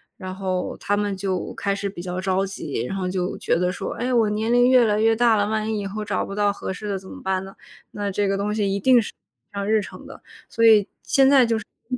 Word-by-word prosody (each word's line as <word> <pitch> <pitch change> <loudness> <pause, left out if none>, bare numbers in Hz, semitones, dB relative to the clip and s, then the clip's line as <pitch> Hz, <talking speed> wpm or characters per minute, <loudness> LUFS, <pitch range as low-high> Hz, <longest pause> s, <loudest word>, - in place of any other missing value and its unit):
然 185 -1 -7
后 185 -1 -3
他 205 - 0
们 205 -2 -1
就 190 -2 -3
开 200 -1 -1
始 200 0 -3
比 175 -3 -8
较 180 +1 -4
着 190 +1 +1
急。 150 -10 -4
然 195 - -4
后 185 -1 -2
就 180 -1 -2
觉 - - +1
得 180 +1 +1
说， - - -5
诶， 250 +2 -2
我 225 -3 +3
年 220 +2 -1
龄 245 +1 +5
越 250 -2 +6
来 210 0 +1
越 225 0 +4
大 235 -1 +4
了， 205 0 +1
万 220 0 -1
一 215 - -1
以 200 - -4
后 210 +2 -5
找 200 - -1
不 195 - -7
到 205 -1 +2
合 190 - -5
适 210 +3 -6
的， 200 - -1
怎 190 0 -11
么 - - -10
办 190 0 -1
呢？ 195 +1 -10 0.4
那 205 -1 -3
这 200 +1 0
个 195 0 0
东 205 +1 -1
西 200 -2 0
一 200 - -1
定 250 +2 +5
是 - - -6 0.4
上 200 0 -3
日 215 -1 +3
程 - - -10
的， - - -12 0.3
所 230 - -1
以 215 -3 +6 0.2
现 - - -10 0.8
在 250 - 0
200 Hz, 280 characters per minute, -23 LUFS, 190-215 Hz, 0.8 s, 越